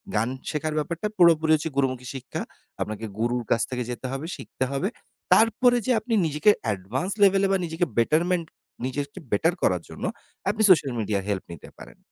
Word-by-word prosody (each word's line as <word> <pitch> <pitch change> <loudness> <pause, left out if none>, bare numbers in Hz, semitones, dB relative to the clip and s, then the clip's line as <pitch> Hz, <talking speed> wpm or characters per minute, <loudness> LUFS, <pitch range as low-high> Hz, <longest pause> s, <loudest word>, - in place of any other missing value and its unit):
গান 110 +4 +2 0.2
শেখার 155 0 -2
ব্যাপারটা 170 +6 -2
পুরোপুরি 160 -3 +5
হচ্ছে 155 +2 -2
গুরুমুখী 130 -2 0
শিক্ষা। 130 -1 -5 0.4
আপনাকে 110 +1 -3
গুরুর 120 +1 0
কাছ 115 - +3
থেকে 125 -2 -2
যেতে 125 +2 -6
হবে, 135 +3 -4
শিখতে - - -5
হবে। 140 +8 0 0.5
তারপরে 245 +2 +4
যেয়ে 245 -4 +3
আপনি 240 - -3
নিজেকে 155 +7 +4
অ্যাডভান্স 110 - -2
লেভেলে 195 0 +5
বা 195 - +3
নিজেকে 165 +2 -1
বেটারমেন্ট 165 +8 +2 0.4
নিজেকে 140 +6 -4
বেটার 165 +12 +3
করার - - +2
জন্য - - -9 0.5
আপনি 220 - -1
সোশ্যাল 155 -7 +5
মিডিয়া 105 -2 0
হেল্প 100 -2 -1
নিতে - - -11
পারেন। - - -12
150 Hz, 170 wpm, -25 LUFS, 125-180 Hz, 0.5 s, পুরোপুরি